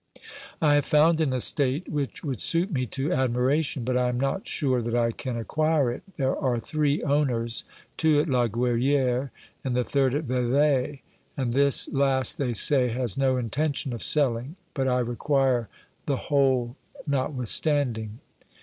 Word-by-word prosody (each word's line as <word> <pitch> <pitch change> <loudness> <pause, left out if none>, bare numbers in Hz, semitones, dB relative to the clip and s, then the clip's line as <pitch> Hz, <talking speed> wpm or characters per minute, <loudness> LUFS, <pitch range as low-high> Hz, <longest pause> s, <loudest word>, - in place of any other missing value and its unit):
I 150 -1 +4
have 145 -1 +2
found 160 +2 +3
an 150 -4 +1
estate 135 +4 +2
which 145 -3 -4
would 135 -8 -3
suit 175 +4 +2
me 130 -5 -2
to 135 +7 -2
admiration, 130 +2 0
but 125 +1 -2
I 125 0 +1
am 125 0 -2
not 135 +9 -2
sure 130 -5 0
that 115 +1 -3
I 115 -1 +1
can 125 +1 -5
acquire 155 +2 0
it; 120 - -7 0.2
there 135 -3 0
are 125 -4 -1
three 150 +4 -1
owners, 125 -6 -1 0.3
two 155 -2 +3
at 150 - 0
La 125 -4 +1
Gruyere 125 +3 0 0.3
and 130 -2 -2
the 125 - +1
third 135 0 0
at 150 - -1
Vevey, 135 +2 0 0.3
and 125 -4 -2
this 140 +1 +4
last, 135 -1 +2
they 125 -4 -1
say, 130 +2 +3
has 120 -3 -2
no 135 -1 +1
intention 135 +3 -2
of 115 - -5
selling, 135 0 +1 0.2
but 135 -1 -1
I 125 -1 +1
require 125 -1 0 0.4
the 140 - 0
whole 130 -4 0 0.3
notwithstanding. 130 -4 0
130 Hz, 160 wpm, -25 LUFS, 125-145 Hz, 0.4 s, I